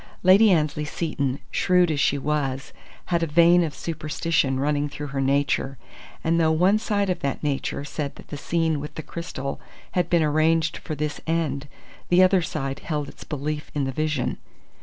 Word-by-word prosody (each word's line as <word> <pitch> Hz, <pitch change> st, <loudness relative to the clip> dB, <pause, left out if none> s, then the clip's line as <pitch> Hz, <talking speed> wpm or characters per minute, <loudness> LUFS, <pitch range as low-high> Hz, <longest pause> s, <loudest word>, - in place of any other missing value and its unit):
Lady 195 Hz, +4 st, +7 dB
Annesley 150 Hz, -3 st, +1 dB
Seton, 145 Hz, -4 st, -2 dB
shrewd 180 Hz, -2 st, +3 dB
as 145 Hz, -, -1 dB
she 140 Hz, -, +2 dB
was, 140 Hz, -2 st, -2 dB, 0.4 s
had 170 Hz, -, +3 dB
a 165 Hz, -, +1 dB
vein 170 Hz, +3 st, +5 dB
of 155 Hz, -3 st, -3 dB
superstition 155 Hz, -3 st, -1 dB
running 145 Hz, +1 st, 0 dB
through 145 Hz, -, -6 dB
her 135 Hz, -1 st, -3 dB
nature, 135 Hz, 0 st, +1 dB, 0.5 s
and, 165 Hz, +1 st, +2 dB
though 160 Hz, -1 st, +3 dB
one 185 Hz, +6 st, +3 dB
side 205 Hz, -3 st, 0 dB
of 180 Hz, -, -2 dB
that 140 Hz, +1 st, -3 dB
nature 140 Hz, 0 st, -2 dB
said 145 Hz, -1 st, -4 dB
that -, -, -14 dB
the -, -, -5 dB
scene 160 Hz, +1 st, 0 dB
with 150 Hz, +1 st, -7 dB
the 155 Hz, -, -5 dB
crystal 140 Hz, -5 st, -5 dB, 0.3 s
had 175 Hz, -2 st, 0 dB
been 170 Hz, -2 st, +3 dB
arranged 155 Hz, +2 st, +2 dB
for 155 Hz, -, -5 dB
this 150 Hz, 0 st, -3 dB
end, 150 Hz, -4 st, -1 dB, 0.4 s
the 180 Hz, +1 st, +6 dB
other 185 Hz, 0 st, +4 dB
side 135 Hz, -4 st, -3 dB
held 150 Hz, -3 st, -3 dB
its -, -, -12 dB
belief 150 Hz, 0 st, -4 dB
in 145 Hz, -, 0 dB
the 135 Hz, -, -1 dB
vision. 155 Hz, +2 st, -1 dB
155 Hz, 180 wpm, -24 LUFS, 145-170 Hz, 0.5 s, Lady